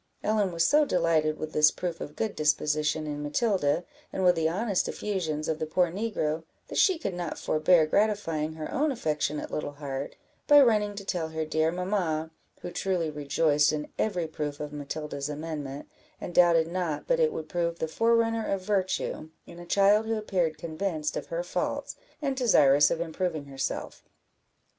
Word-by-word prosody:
Ellen 210 -3 +1
was 170 0 +2
so 300 +1 +5
delighted 165 - +1
with 155 0 -6
this 150 0 +6
proof 175 -2 -5
of 150 - -7
good 220 -2 -2
disposition 150 +1 +1
in 145 -1 -4
Matilda, 170 -1 +1 0.3
and 190 - -2
with 180 -1 +6
the 160 -1 +1
honest 200 +2 0
effusions 160 -7 -2
of 160 -1 -1
the 155 - -2
poor 175 +2 +2
negro, 170 -6 -2 0.3
that - - -1
she 375 -3 +4
could 200 - -3
not 175 -2 -4
forbear 155 +1 +3
gratifying 165 -4 0
her 155 -1 -6
own 295 +2 +1
affectionate 150 - -2
little 145 -1 -3
heart, 140 -1 -5 0.3
by 290 0 +8
running 210 -6 +3
to 200 -1 -7
tell 170 -4 -2
her 160 0 -3
dear 160 +1 +1
mamma, 175 -4 -1 0.3
who 175 - -5
truly 175 -4 -1
rejoiced 150 0 +2
in 150 -1 -4
every 180 -6 0
proof 150 -2 -4
of 150 0 -6
Matilda's 145 0 -5
amendment, 150 -2 -5 0.3
and 175 - -6
doubted 170 -2 +5
not 170 -3 -3
but - - +1
it 475 -1 +3
would 155 - -5
prove 170 0 -1
the 160 - -2
forerunner 230 +3 +1
of 195 -1 0
virtue, 185 -5 -1 0.2
in 170 - -12
a 175 - -10
child 205 +4 +4
who 225 - 0
appeared 180 -7 -1
convinced 160 -2 -3
of - - -4
her - - -3
faults, - - -3 0.3
and 275 -2 0
desirous 145 - +5
of 165 - -1
improving 165 -2 -2
herself. 135 -1 -4
165 Hz, 175 wpm, -28 LUFS, 155-200 Hz, 0.3 s, by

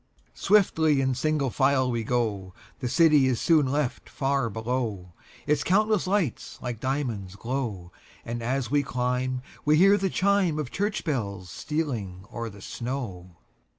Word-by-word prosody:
Swiftly 160 -8 +3
in 130 -1 +1
single 140 0 0
file 135 -1 +2
we 115 -1 -1
go, 105 -6 -1 0.2
The 125 - -2
city 150 -3 +5
is 125 -3 +1
soon 155 -5 +4
left 140 -1 -2
far 135 -3 0
below, 110 -5 -3 0.3
Its 150 -1 +1
countless 210 0 +2
lights 165 - -1
like 120 -3 -5
diamonds 120 -8 -2
glow; 110 -7 -4 0.3
And 120 0 -4
as 125 +1 -1
we 145 0 +4
climb 125 0 -1 0.2
we 150 +1 +4
hear 195 +4 +6
the 195 - 0
chimeOf 185 -9 +1
church 205 +2 -1
bells 100 - -3
stealing 115 - -3
o'er 115 -1 -4
the 100 -1 -13
snow. 105 -9 -5
130 Hz, 145 wpm, -26 LUFS, 115-150 Hz, 0.3 s, hear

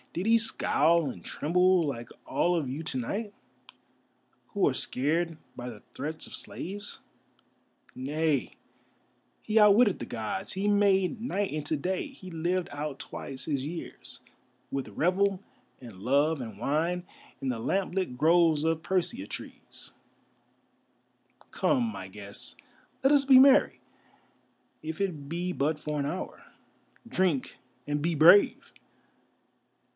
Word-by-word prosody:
Did 175 - -3
he 230 +1 +5
scowl 170 -7 +2
and 90 -9 -9
tremble, 180 +2 +2
like 120 -5 -4 0.2
all 175 0 +1
of 155 -5 -1
you 140 +5 -4
to 155 - -3
night, 200 - -3 1.1
who 200 - +1
are 140 - +2
scared 160 +6 -1 0.2
by 125 0 -6
the 110 -3 -11
threats 155 +3 -5
of - - -7
slaves? 205 +3 -6 1.0
Nay, 145 +1 -1 0.9
he 220 0 -1
outwitted 210 0 +6
the - - -4
Gods, 110 -2 -4
he 195 +2 -1
made 200 +1 +3
night 205 - -1
into 155 0 -2
day, 185 - -2
he 265 -10 -12
lived 175 +2 -1
out 145 -1 -5
twice 135 -1 -7
his 140 -3 -1
years, 165 +3 -7 0.5
with 135 -1 -3
revel 190 +3 +1 0.4
and 115 -7 -11
love 140 +5 +2
and 110 -4 -7
wine 160 +9 0 0.4
in 135 - -4
the 125 -3 -1
lamp 190 +11 -1
lit 185 -10 -1
groves 160 0 +4
of 160 0 0
persea 190 - -1
trees. - - -9 1.6
Come, 260 -4 +2
my 225 - -6
guests, - - -8 0.4
let 270 +2 +4
us 285 -1 +5
be 265 -2 +8
merry, 270 +1 +6 1.0
if 160 0 -6
it 160 -8 -3
be 175 +2 -2
but 150 +1 0
for 150 -1 -3
an 140 - -1
hour. 170 +6 -5 0.6
Drink, 185 - 0 0.3
and 145 0 -1
be 170 +3 0
brave!" 170 +7 +6
165 Hz, 135 wpm, -29 LUFS, 145-190 Hz, 1.6 s, be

